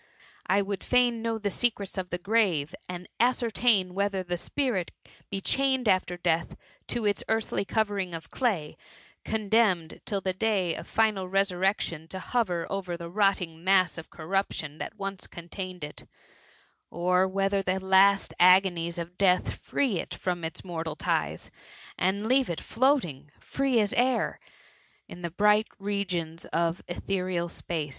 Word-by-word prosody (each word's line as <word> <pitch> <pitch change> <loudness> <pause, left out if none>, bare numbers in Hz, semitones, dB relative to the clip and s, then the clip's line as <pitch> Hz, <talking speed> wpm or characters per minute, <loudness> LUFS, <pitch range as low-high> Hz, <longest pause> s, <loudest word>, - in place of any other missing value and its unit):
I 200 +2 +3
would 200 0 -4
fain 245 -2 +2
know 230 0 -1
the 205 -2 -2
secrets 205 -3 -1
of 185 -2 -3
the 175 - -2
grave, 180 -6 +1 0.2
and 180 0 -6
ascer 240 -1 +2
tain 200 -7 +3
whether 200 -1 0
the 175 0 -2
spirit 210 -1 -1 0.4
be 195 -1 -3
chained 265 +1 +1
after 185 -2 +2
death 170 -1 0 0.3
to 240 -3 -1
its 205 -1 +1
earthly 220 -2 0
covering 200 -5 -1
of 165 0 -9
clay, 195 - -1 0.5
condemned 210 -6 +1
till 200 - -1
the 190 -1 -2
day 190 -3 +1
of 170 - -7
final 215 -4 +1
resurrection 190 -4 0
to 190 - -6
hover 185 -4 -1
over 185 -3 -3
the 170 0 -8
rotting 180 -5 +1
mass 185 -2 +3
of 160 - -11
corruption 160 -3 -3
that 220 - -6
once 195 -1 -5
con* 170 0 -11
tained 185 -3 -6
it; 150 - -8 0.8
or 180 +2 +2
whether 195 +1 +1
the 190 0 0
last 190 +1 +4
agonies 180 -2 +5
of 170 +1 -6
death 185 -2 +3
free 245 -11 0
it - - -5
from 175 -2 -3
its 160 - -4
mortal 165 -3 -4
ties, - - -1 0.4
and 200 +3 0
leave 260 +1 +3
it 170 - -2
float*^ 265 +2 +2
ing, 145 -2 -9
free 270 -3 0
as 205 -2 +2
air, 250 0 +1 0.7
in 175 - -10
the 170 - -3
bright 210 +5 +3
regions 185 -5 -3
of 170 +1 0
ethereal 180 -1 -2
space 165 -3 -4
190 Hz, 155 wpm, -28 LUFS, 175-210 Hz, 0.8 s, agonies